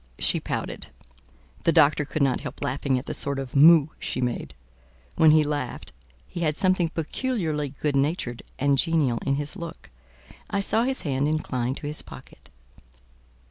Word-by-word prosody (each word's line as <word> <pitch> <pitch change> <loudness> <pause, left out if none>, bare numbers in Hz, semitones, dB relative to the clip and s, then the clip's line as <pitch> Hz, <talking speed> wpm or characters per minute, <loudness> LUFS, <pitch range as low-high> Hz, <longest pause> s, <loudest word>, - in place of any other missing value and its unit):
She - - +3
pouted. - - -4 0.8
The 165 - +4
doctor 150 -1 +4
could 145 +1 -1
not 135 -2 +1
help - - -7
laughing 135 -1 0
at 125 - -5
the - - -4
sort 140 -1 -2
of 135 -1 -6
"moue" 155 +1 +7
she - - -3
made: 120 - -3 0.6
when 160 - +6
he 155 0 +6
laughed, 145 -1 -4 0.3
he - - -7
had 155 -3 0
something 185 -3 +2
peculiarly 165 - -2
good 150 -2 0
natured 135 -4 -1 0.2
and 140 0 +2
genial 145 -6 +2
in 135 - +2
his 145 +5 -3
look. 170 -4 -9 0.6
I 200 - -1
saw 220 +4 +1
his 265 0 -1
hand 140 -1 0
incline 130 -5 -1
to - - -8
his 150 +1 -2
pocket. - - -14
150 Hz, 165 wpm, -25 LUFS, 135-165 Hz, 0.8 s, moue